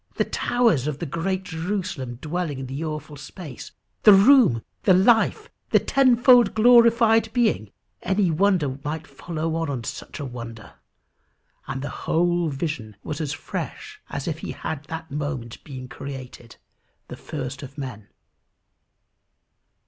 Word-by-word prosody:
The - - +1
towers 230 - +1
of 150 -3 -2
the 170 - -4
great 185 +5 -2
Jerusalem 170 -7 -4
dwelling 155 +2 -3
in 135 - -5
the 135 +4 -5
awful 150 -1 -5
space! 145 0 -9 0.3
The 210 - +9
room! 200 - +6 0.2
The 185 - +5
life! 225 - +3 0.2
The - - +5
tenfold 245 -4 +5
glorified 230 -1 +5
being! 220 - +1 0.3
Any 190 -1 +1
wonder 160 -6 +1
might 155 +1 -4
follow 165 -1 -4
on 145 -7 -2
such - - -7
a 145 - -4
wonder. 115 -4 -8 0.9
And 135 0 -4
the 145 - -3 0.2
whole 175 0 +2
vision 135 -7 -4
was 155 +1 -4
as 150 -3 -2
fresh - - -6
as - - -5
if - - -3
he - - -5
had 155 -2 -5
that 160 +1 -7
moment 140 -5 -5
been 130 -3 -8
created, 130 -3 -9 0.5
the - - -7
first 135 -2 -6
of 140 0 -10
men. 125 -7 -7
160 Hz, 140 wpm, -24 LUFS, 135-195 Hz, 0.9 s, The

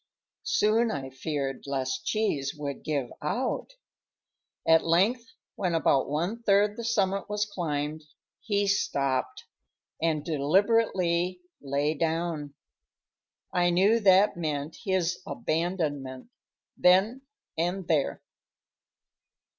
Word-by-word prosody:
Soon 230 - +3
I 135 -6 -4
feared 135 0 -4
lest 135 -2 -2
Cheese 155 -11 0
would 140 -2 -5
give 140 -5 -2
out. 245 - -2 0.9
At 160 0 +6
length, 205 +9 +2 0.3
when 180 -4 -1
about 140 -4 +2
one 175 +10 -2
third 205 -1 +3
the 235 - -6
summit 200 -4 0
was 210 0 0
climbed, 155 -6 -3 0.3
he 205 -2 0
stopped 140 -9 0 0.6
and 160 -2 0
deliberately 180 +2 +1 0.2
lay 145 +2 0
down. 160 -2 -2 1.0
I 175 -1 +3
knew 195 +6 +4
that 195 -1 +5
meant 155 -2 -3
his 185 -2 0
abandonment, 155 - -2 0.4
then 195 +8 +4 0.3
and 175 +2 -2
there. 150 -4 0
170 Hz, 100 wpm, -28 LUFS, 145-200 Hz, 1.0 s, At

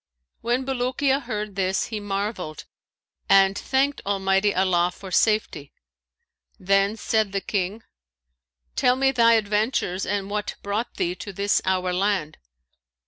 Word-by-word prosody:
When 245 +3 0
Bulukiya 265 +2 0
heard 215 -4 -4
this, 190 -1 0
he 215 - -2
marvelled 195 -5 -4 0.6
and 195 0 +5
thanked 270 +5 0
Allah 200 - 0
Almighty 195 +1 +2 0.5
for 190 -2 -9
safety. 215 +3 +1 0.9
Then 195 +2 +2
said 215 -2 0
the 195 - +1
King, 195 +2 -3 0.9
'Tell 250 - +3
me 270 +1 +2
thy 230 -3 +5
adventures 210 -3 0
and 200 0 -1
what 210 +1 -3
brought 210 +4 -3
thee 175 - -1
to 200 +3 -8
this 200 +2 +1
our 185 -1 0
land.' 185 -4 -1
205 Hz, 130 wpm, -24 LUFS, 195-230 Hz, 0.9 s, and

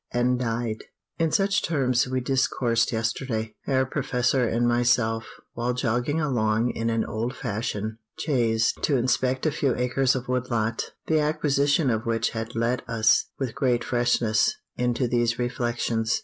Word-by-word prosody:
_" - - +2
and 125 +1 +2
died! 115 -2 -2 0.3
In 165 -1 +2
such 195 +2 +2
terms 130 -6 +1
we 130 0 -1
discoursed 125 -2 +1
yesterday, 115 -1 -2
Herr 130 -1 +2
Professor 125 -2 0
and 120 +2 +1
myself, 120 -2 +2 0.3
while 120 +1 -1
jogging 125 +4 0
along 120 -5 +1
in 115 0 -2
an 115 -1 0
old 115 +4 -3
fashioned 110 -2 -3 0.2
chaise 115 -6 +1
to 140 - +2
inspect 130 +2 0
a 155 - +3
few 135 -3 0
acres 125 +1 +1
of 130 0 -4
wood 125 0 -1
lot, 115 -1 -1
the 160 -1 +2
acquisition 145 -2 +2
of 110 0 -2
which 115 0 0
had 115 +1 -5
let 115 +2 0
us, 115 0 +3
with 130 -4 -3
great 125 -3 +1
freshness, 120 - +2 0.2
into 125 0 0
these 120 -1 +1
reflections. 120 - -1
120 Hz, 155 wpm, -25 LUFS, 115-130 Hz, 0.3 s, a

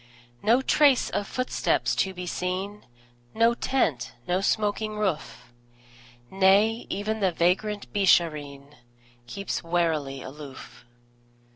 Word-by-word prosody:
No 240 +4 +3
trace 280 -2 +3
of 205 - -2
footsteps 255 0 0
to 190 - +1
be 180 -1 -7
seen, 185 +3 -4 0.5
No 230 +1 +4
tent, 165 - -1
no 180 +2 +1
smoking 215 +1 0
roof; 180 - -3 0.8
Nay, 200 +4 +3
even 215 +3 -2
the 190 -3 +2
vagrant 190 +5 0
Beeshareen 150 -7 +1 0.5
Keeps 200 +8 -4
warily 160 -6 -1
aloof. 135 -2 -11
190 Hz, 105 wpm, -26 LUFS, 165-215 Hz, 0.8 s, No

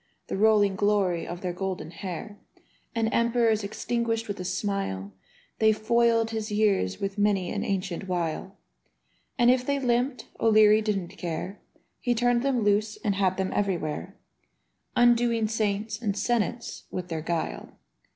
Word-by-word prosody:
The - - -2
rolling 205 -1 +4
glory 195 -4 +1
of 175 +1 -6
their 180 -2 -2
golden 185 -2 -4
hair, 195 +3 -7 0.6
And 225 -1 +1
emperors 235 -2 +2
extinguished 225 +2 -2
with 205 -2 -4
a - - -3
smile. 185 - -2 0.5
They 220 0 +5
foiled 230 +1 +2
his 220 -1 -3
years 205 - +1
with 195 +1 -3
many 200 -3 +2
an 205 0 -2
ancient 195 -3 -2
wile, 180 +2 -3 0.8
And 240 -1 +6
if 255 0 +2
they 280 +2 0
limped, 250 +1 0
O'Leary 215 -1 +6
didn't 200 -4 -2
care: 180 +3 -4 0.4
He 245 -1 0
turned 240 +1 +2
them 260 -3 +1
loose 210 +1 +1
and 205 - +1
had 190 -1 +1
them 190 -1 -1
everywhere, 170 - -2 0.8
Undoing 240 -2 +4
saints 215 0 -1
and 205 -3 -1
senates 235 +2 -1
with 180 -1 -5
their 160 -2 -3
guile. 165 0 -3
210 Hz, 145 wpm, -27 LUFS, 190-230 Hz, 0.8 s, And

